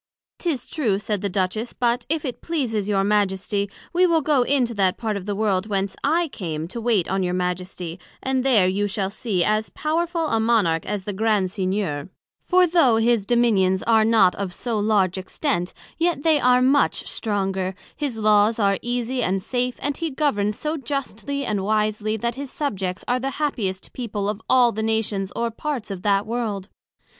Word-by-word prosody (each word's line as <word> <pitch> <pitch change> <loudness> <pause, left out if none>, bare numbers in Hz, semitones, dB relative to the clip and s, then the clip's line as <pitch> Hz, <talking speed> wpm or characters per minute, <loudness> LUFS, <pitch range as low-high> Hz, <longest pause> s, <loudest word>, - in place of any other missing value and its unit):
'Tis 320 -8 -2
true, 230 -11 0
said 210 -1 -2
the 200 - -1
Duchess; 195 +5 -2
but 240 0 0
if 320 0 0
it 255 - -5
pleases 230 -11 -1
your 195 -2 +2
Majesty, 200 0 0 0.2
we 360 +1 +4
will 325 -3 +2
go 290 -3 +3
into 245 -2 +2
that 190 -3 +1
part 220 -2 -2
of 200 0 -6
the 205 - -1
World 200 -2 0
whence 195 -2 -1
I 330 +4 +2
came 160 - -4
to 235 - -5
wait 220 -7 +2
on 195 +1 0
your 180 -1 0
Majesty, 180 -1 -3 0.2
and 260 -1 0
there 230 -9 +4
you 200 +2 0
shall 195 -1 -2
see 205 -5 -1
as 215 +2 +1
powerful 335 +2 -1
a 225 - +1
Monarch 215 -8 +2
as 205 -2 -2
the 205 - -4
Grand 205 -2 +1
Signior; 185 -6 -2 0.4
for 365 0 +5
though 325 -9 +4
his 225 -2 +2
Dominions 205 -6 +3
are 225 -1 +4
not 220 -4 +5
of 195 -3 -4
so 235 -3 -2
large 200 -3 +2
extent, 185 - -2 0.3
yet 335 -4 +1
they 315 -2 +4
are 250 -1 +4
much 275 +3 +2
stronger, 190 -3 -2 0.2
his 285 -6 -3
Laws 215 0 +4
are 200 -3 +2
easie 245 +1 -2
and 195 -3 +1
safe, 250 +5 -2
and 285 0 -1
he 330 -1 -2
governs 215 -8 0
so 305 +1 -2
justly 275 0 -3
and 205 -4 -1
wisely, 215 +1 0
that 235 +2 -1
his 275 +2 -6
Subjects 195 -11 -3
are 245 +1 +1
the 265 +2 -2
happiest 210 -11 -2
people 210 -5 -3
of 210 +1 -3
all 245 -2 +5
the 220 - -3
Nations 220 -3 -1
or 235 0 -1
parts 255 -2 -4
of 190 -2 -5
that 200 +1 +2
World. 215 -4 -3
215 Hz, 190 wpm, -23 LUFS, 195-255 Hz, 0.4 s, for